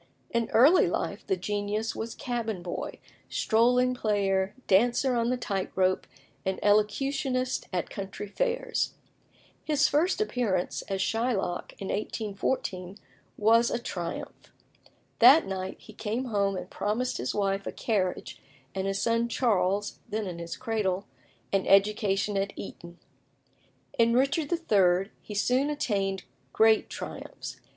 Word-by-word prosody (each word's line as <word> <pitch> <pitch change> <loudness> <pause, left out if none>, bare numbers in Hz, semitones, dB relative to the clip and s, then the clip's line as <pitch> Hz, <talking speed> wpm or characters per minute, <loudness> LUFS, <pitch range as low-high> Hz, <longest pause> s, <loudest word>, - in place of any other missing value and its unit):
In 235 -1 0
early 285 +10 +6
life - - -3
the 385 - +1
genius 210 +2 -2
was 225 +1 -5
cabin 225 -7 -3
boy, 175 - -5 0.3
strolling 250 +3 +3
player, 200 -5 0
dancer 240 +6 +3
on 235 0 +1
the 255 - +1
tight 195 -6 -3
rope, 185 0 +1 0.4
and 190 0 -2
elocutionist 255 +5 +1
at 180 -2 -2
country 195 +1 -6
fairs. 485 - -1 0.7
His 295 -2 +3
first 345 +7 +2
appearance, 235 - 0
as 195 -1 -2
Shylock, 225 -6 -1
in 195 - -5
1814, 200 -3 -3 0.4
was 230 +2 +4
a - - 0
triumph. 175 -7 -6 0.7
That 265 +7 +8
night 190 -1 -4
he 215 - -14
came 220 +4 -3
home 200 -4 0
and - - -6
promised 230 +5 -1
his 125 - -3
wife 195 -1 0
a - - -2
carriage, 190 -5 -2 0.3
and 190 0 -2
his 195 0 -1
son 230 0 +1
Charles 205 -4 +1
(then 215 0 -2
in 175 -3 -5
his 170 0 -6
cradle) 210 -6 -1 0.5
an 195 -1 +1
education 200 0 +3
at 195 +1 -1
Eton. 170 -3 -9 1.0
In 230 0 +5
Richard 280 +4 +1
III. 195 - +2
he 210 - -8
soon 255 +7 +2
attained 195 -9 -1 0.3
great 220 0 +4
triumphs. - - -7
210 Hz, 130 wpm, -28 LUFS, 195-245 Hz, 1.0 s, That